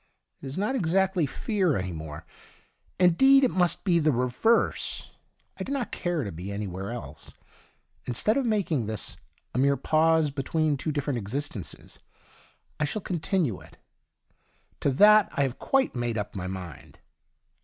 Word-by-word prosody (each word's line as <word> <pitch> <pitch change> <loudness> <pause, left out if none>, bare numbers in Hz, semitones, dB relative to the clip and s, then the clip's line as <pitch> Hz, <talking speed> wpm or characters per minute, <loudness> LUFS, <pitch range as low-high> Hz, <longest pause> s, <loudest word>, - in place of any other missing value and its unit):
It 140 - -7
is 135 - -6
not 210 +7 0
exactly 190 - +1
fear 185 - 0
any 95 -1 -3
more 80 0 -8 0.4
— - - -40
indeed^ 270 +11 +6
it 255 - +3
must 175 -2 +1
be 175 -3 +3
the 155 -1 +2
I'evei'se. 125 - +1 0.5
I - - -2
do - - -6
not 270 -6 -2
care 175 -5 -2
to 100 - -5
be 90 +5 -7
any 105 +1 -3
where 95 +1 -5
else. 80 - -8 0.7
Instead 170 - +1
of 275 - +1
making 190 - 0
this 110 -2 -3 0.4
a - - -1
mere 140 +1 +3
pause 160 -1 +2
between 150 +2 0
two 155 +3 -3
different 145 -3 -2
existences, 105 - -5 0.8
I 150 - +2
shall 195 +7 -4
continue 165 - -1
it. - - -17 1.0
To - - +1
that 210 +8 +6
I 140 - +1
have 130 -2 -3
quite 270 -1 +1
made 120 -2 -2
up 105 - -4
my 90 -2 -4
mind. 90 -5 -8
145 Hz, 160 wpm, -27 LUFS, 110-185 Hz, 1.0 s, indeed^